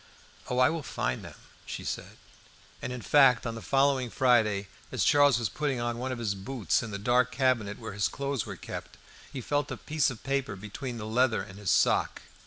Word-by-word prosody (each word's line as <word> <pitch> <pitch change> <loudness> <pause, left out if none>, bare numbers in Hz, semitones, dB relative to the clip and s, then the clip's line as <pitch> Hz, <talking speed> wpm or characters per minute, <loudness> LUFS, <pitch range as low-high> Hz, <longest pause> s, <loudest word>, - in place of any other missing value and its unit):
"Oh, 125 - -1
I 125 +3 +5
will 165 -1 -3
find 65 - -3
them," - - -10 0.3
she - - -6
said. - - -5 0.6
And, - - -4
in 125 -2 -6
fact, 135 -5 +5
on 115 - -2
the 115 - -7
following 135 -2 +2
Friday, 110 -6 +2 0.2
as - - 0
Charles 145 -4 +5
was 115 -2 0
putting 145 -4 -2
on 120 0 -2
one 130 +1 -3
of 130 - -3
his 110 -4 -1
boots 100 +1 -1
in 115 - -6
the 100 - -4
dark 125 +4 +2
cabinet 115 -5 +1
where - - -7
his 100 -1 +1
clothes 140 -3 -2
were - - -7
kept, - - -8 0.3
he 130 - -5
felt 145 +4 -1
a - - -4
piece 150 -2 +1
of 120 -4 -8
paper 135 -6 -1
between 105 +5 -6
the 105 - -5
leather 115 +2 +2
and 100 +1 -11
his 105 -3 -2
sock. - - +2
125 Hz, 210 wpm, -29 LUFS, 110-135 Hz, 0.6 s, I